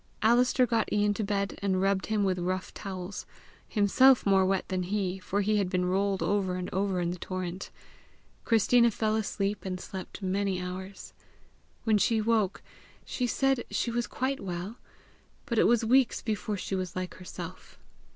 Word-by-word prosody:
Alister 245 +3 +4
got 230 -2 0
Ian 205 0 +2
to 215 - -3
bed, 200 -1 -2
and 190 -2 +1
rubbed 195 0 +1
him 215 -2 +1
with 185 -2 +1
rough 185 +1 -2
towels 190 0 -6 0.4
himself 250 +5 +4
more 195 -1 +4
wet 190 0 0
than 185 -1 -1
he, 190 0 -2
for 200 +2 -1
he 210 +1 +2
had 195 -3 0
been 180 -1 0
rolled 195 +1 0
over 195 -3 0
and 180 0 -5
over 190 -1 0
in 175 0 0
the 180 - -6
torrent. 185 0 -5 0.7
Christina 235 +1 +4
fell 215 0 0
asleep, 205 -2 -2
and 185 -1 -4
slept 190 +2 -8
many 190 0 0
hours. 185 +2 -7 0.7
When 215 -2 +3
she 225 +2 +2
woke, 215 -3 +1 0.4
she 250 - -2
said 270 +1 +1
she 235 - -1
was 240 0 -1
quite 270 +1 -2
well; 185 +4 -5 0.7
but 235 -6 0
it - - +5
was 235 -1 +3
weeks 255 +2 +3
before 215 -1 -2
she 185 - -5
was 185 -2 -3
like 185 0 -4
herself. 180 0 -9
200 Hz, 170 wpm, -29 LUFS, 185-220 Hz, 0.7 s, it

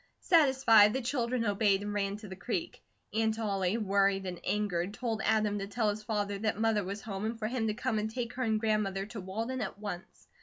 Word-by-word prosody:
Satisfied, 265 - +6
the 265 - -1
children 240 -1 0
obeyed 205 -1 +2
and 205 0 -3
ran 200 0 -1
to 210 0 -10
the 190 - -7
creek. 185 -1 -4 0.3
Aunt 220 0 +1
Ollie, 200 -2 0
worried 195 -2 +2
and 180 -2 -5
angered, 200 -2 -1
told 225 -3 -2
Adam 215 -2 +2
to 195 - -4
tell 215 0 +1
his 210 +1 -6
father 205 -2 -2
that 215 0 -1
Mother 220 -2 +2
was 195 +2 -5
home 195 -2 -5
and 225 +1 -2
for 220 - -4
him 230 -1 -1
to 210 - -1
come 240 -2 -1
and 215 +1 -2
take 235 +1 -4
her 255 - -5
and 220 -3 +1
grandmother 210 -3 0
to 215 0 -7
Walden 225 +7 -3
at 195 -2 -4
once. 205 -1 -8
215 Hz, 220 wpm, -31 LUFS, 200-225 Hz, 0.3 s, Satisfied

